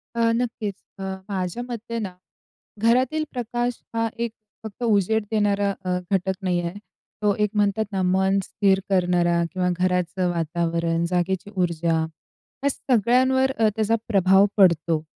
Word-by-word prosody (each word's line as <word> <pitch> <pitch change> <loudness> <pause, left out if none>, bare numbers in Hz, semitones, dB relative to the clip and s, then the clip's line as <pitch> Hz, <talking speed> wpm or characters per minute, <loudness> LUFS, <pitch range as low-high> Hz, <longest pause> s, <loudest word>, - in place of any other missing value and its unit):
अ, 230 0 +3
नक्कीच. 230 -4 -2 0.3
अ, - - -5 0.3
माझ्या 190 +3 -3
मते 230 -1 -5
ना, 195 -4 -4 0.7
घरातील 255 +7 +3
प्रकाश 240 -1 -2
हा 230 0 +1 0.2
एक 235 - -5 0.3
फक्त 220 +2 -7
उजेड 220 -1 +2
देणारा 205 -2 +2 0.2
अ, 180 0 0
घटक 190 -1 +1
नाही 180 -2 0
आहे. 170 +3 -5 0.4
तो 205 -1 +3
एक 210 - +2
म्हणतात 205 +1 +2
ना, 195 -2 -1
मन 190 +2 +2
स्थिर 195 0 +2
करणारा 175 -2 +2
किंवा 185 -1 0
घराचं 180 0 0
वातावरण, 170 0 -1
जागेची 180 +2 -1
ऊर्जा, 170 -2 +1 0.6
या 280 - +3
सगळ्यांवर 260 +1 +2
अ, 225 - +4
त्याचा 220 0 +2
प्रभाव 195 -2 +5
पडतो. 170 -4 +3
195 Hz, 140 wpm, -24 LUFS, 180-225 Hz, 0.7 s, प्रभाव